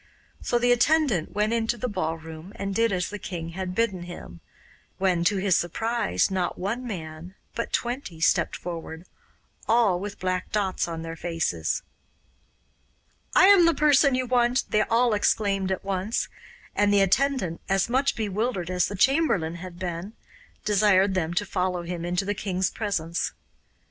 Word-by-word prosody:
So 240 - +1
the 245 +1 +3
attendant 245 - +2
went 210 +2 +1
into 230 +1 0
the 250 - -2
ballroom 165 -2 -5
and 195 0 -3
did 230 +2 +2
as 180 0 -1
the 210 - -5
king 170 -3 -5
had 180 +1 -5
bidden 205 -5 0
him, 175 - -9 0.6
when, 185 -3 +1
to 200 +3 +3
his 190 -2 +2
surprise, 175 - 0
not 185 -2 -1
one 230 +7 -3
man, 165 -2 -7 0.2
but 235 - -3
twenty, 240 - -3
stepped 170 0 +2
forward, 165 -1 -7 0.6
all 220 -6 +3
with 200 +1 -6
black 185 0 -2
dots 195 -4 0
on 165 -1 -5
their 165 0 -6
faces. 160 - -2 1.5
'I - - +8
am 390 -3 +7
the 335 - +3
person 290 -2 +4
you 255 0 0
want,' 245 +1 +2
they 215 - +3
all 230 +2 +2
exclaimed 200 -2 +1
at 190 - -3
once, 195 +3 -1 0.5
and 205 0 +3
the 200 -1 +4
attendant, 195 -3 +1
as 195 0 +2
much 265 +3 +1
bewildered 210 -3 -2
as 180 0 +2
the 200 - -5
chamberlain 205 - +2
had 175 0 -9
been, 180 +3 -5 0.5
desired 200 -2 +4
them 170 -2 -1
to 205 - +1
follow 180 -2 -1
him 170 0 -5
into 180 +2 -1
the 205 - 0
king's 190 -2 -1
presence. 175 -6 -2
195 Hz, 160 wpm, -26 LUFS, 175-230 Hz, 1.5 s, I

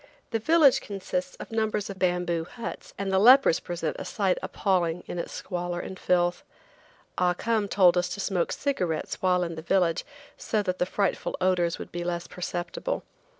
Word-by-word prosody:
The 225 - 0
village 305 +2 +5
consists 185 -2 -4
of - - -10
numbers 215 -2 0
of 195 -1 -8
bamboo 175 -2 +1
huts, 235 +6 -8
and 195 0 -2
the 190 - +4
lepers 255 -2 +7
present 170 -3 -3
a - - -4
sight 195 -3 0
appalling 180 -4 0
in 175 - -5
its - - -4
squalor 175 -1 -4
and 190 +1 -7
filth. 175 -1 +1 0.8
Ah 180 -1 +3
Cum 220 0 0
told 185 -3 +5
us 180 0 -1
to - - -10
smoke 185 -3 0
cigarettes 180 - -2
while 180 -1 +3
in 170 -1 -3
the 160 - -6
village 170 -1 +1 0.3
so 215 -2 -1
that 185 -2 -2
the 180 - +1
frightful 200 0 -1
odors 180 -2 +2
would - - -8
be 175 0 -4
less 175 0 -2
perceptible. 180 - -4
180 Hz, 180 wpm, -27 LUFS, 175-205 Hz, 0.8 s, lepers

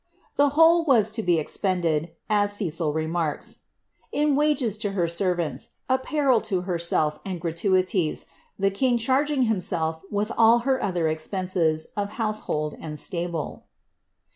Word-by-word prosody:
The 285 0 +4
whole 330 +1 +6
w«g 235 -9 +4
to 220 +1 -1
be 175 -4 +2
ex|>cnded," 165 -1 -1 0.2
as 205 -1 +2
Cecil 170 -6 0
remarks, 160 0 -2 0.5
"in 295 -1 +1
wagea 265 -8 +1
lo 205 - -1
her 175 -4 +1
servants, 170 -5 -1
apparel 260 -1 +2
to 195 -5 -1
herself, 170 -4 0
and 185 -3 -5
gratuities, 180 0 0 0.3
the 195 0 +1
king 245 +4 +1
charging 265 +4 +2
himself 170 -7 -1
with 210 +2 -1
all 230 +1 +5
her 265 -1 +1
other 175 -5 0
ex 155 0 -2
penses 180 -5 -1
of 205 0 -3
household 215 -9 -2
and 155 -2 -6
atable." 170 -1 -3
190 Hz, 140 wpm, -25 LUFS, 165-230 Hz, 0.5 s, whole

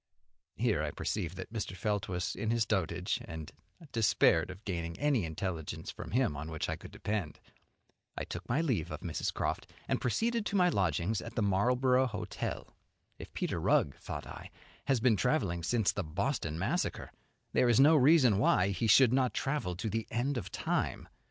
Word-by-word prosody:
Here - - +1
I - - -1
perceived 90 -4 -3
that 95 +4 -7
Mr. 105 -4 -4
Felt 105 +2 -1
was 90 -2 -2
in 110 +2 -2
his 115 -1 +2
dotage, 90 -3 -1
and 80 -2 -7 0.3
I 170 - -14
despaired 95 -6 +3
of 90 +4 -10
gaining 85 -3 -3
any 140 - +2
intelligence 80 0 -4
from - - -8
him 120 - +1
on 80 +2 -5
which 80 -1 -3
I - - -1
could - - -11
depend. 100 -8 -3 0.8
I - - -2
took - - -7
my 135 +7 +2
leave 110 - 0
of 75 -1 -6
Mrs. 85 -3 -2
Croft, - - -2 0.2
and - - 0
proceeded 230 - 0
to - - -3
my 180 -2 +5
lodgings 95 - 0
at 115 - -9
the 115 - +1
Marlborough 125 +6 +3
Hotel. 120 - -5 0.4
If - - -9
Peter - - -2
Rugg, 70 - +2
thought - - -6
I, - - -9 0.4
has 135 -3 +2
been 115 -2 +3
travelling 90 - +1
since 110 +4 +2
the 100 - -3
Boston 85 - -2
Massacre, - - -2 0.4
there 125 - +4
is 120 - +4
no 150 +4 +7
reason 135 -7 +5
why 95 -3 +3
he 100 +4 -1
should 125 +3 +6
not 130 -1 +2
travel 135 -11 -1
to 100 +6 -4
the 110 +1 -2
end 130 +5 -1
of 120 - -4
time. - - -2
105 Hz, 185 wpm, -32 LUFS, 90-125 Hz, 0.8 s, no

